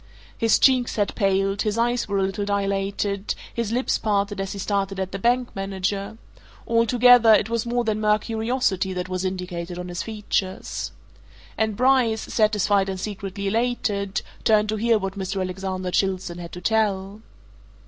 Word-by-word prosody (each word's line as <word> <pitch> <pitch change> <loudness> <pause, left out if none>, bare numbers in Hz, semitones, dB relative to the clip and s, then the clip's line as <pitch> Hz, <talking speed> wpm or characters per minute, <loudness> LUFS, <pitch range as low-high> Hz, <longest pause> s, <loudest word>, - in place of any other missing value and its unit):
His 225 -2 +3
cheeks 255 -3 +3
had 205 -2 0
paled, 195 -1 +1
his 215 0 -1
eyes 240 +1 +1
were 200 -1 -1
a 195 - +2
little 195 +2 -2
dilated, 200 0 -1 0.2
his 235 -2 -2
lips 250 +3 0
parted 205 -2 0
as 195 +1 -4
he - - -7
stared 195 -1 -1
at 190 -1 -3
the 195 - -4
bank 240 +3 +1
manager 195 +2 -3 0.5
altogether, 235 0 +6
it 210 +2 0
was 230 0 -1
more 240 0 0
than 215 -1 -1
mere 210 0 +4
curiosity 220 -4 -1
that 180 0 -3
was 185 0 -2
indicated 180 -2 -4
on 180 0 -6
his 175 0 -4
features. 210 -3 -3 0.6
And 220 -1 0
Bryce, 250 -4 +3
satisfied 210 -2 +2
and 190 -1 -4
secretly 200 0 -5
elated, 205 -3 -1 0.2
turned 215 -1 +3
to 215 - 0
hear 230 +1 +3
what 195 -1 -4
Mr. 190 +1 -3
Alexander 185 0 -3
Chilstone 185 -2 -1
had 170 -1 -8
to 180 - -7
tell. 205 -1 0
200 Hz, 165 wpm, -24 LUFS, 190-225 Hz, 0.6 s, altogether